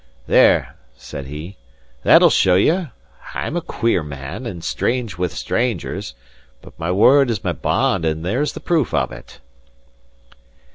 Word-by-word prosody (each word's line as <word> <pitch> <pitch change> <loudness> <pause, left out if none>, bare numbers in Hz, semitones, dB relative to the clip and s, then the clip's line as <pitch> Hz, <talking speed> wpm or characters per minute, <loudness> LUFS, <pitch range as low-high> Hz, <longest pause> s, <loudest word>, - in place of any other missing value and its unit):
"There," - - +4 0.2
said 70 - -8
he, 75 +7 -8 0.4
"that'll - - +6
show 90 -1 +4
you! 160 - +2 0.5
I'm 155 - -3
a 175 - 0
queer 115 - 0
man, 70 -3 -7
and 85 -3 -7
strange 115 -8 -2
wi' 90 - +1
strangers; 100 - -3 0.5
but - - -14
my 85 +2 -2
word 130 +8 +5
is 110 -5 -2
my - - 0
bond, 95 - 0
and 80 0 -2
there's 125 +11 -1
the - - -7
proof 155 - 0
of 65 -3 0
it." - - -12
95 Hz, 145 wpm, -20 LUFS, 80-125 Hz, 0.5 s, that'll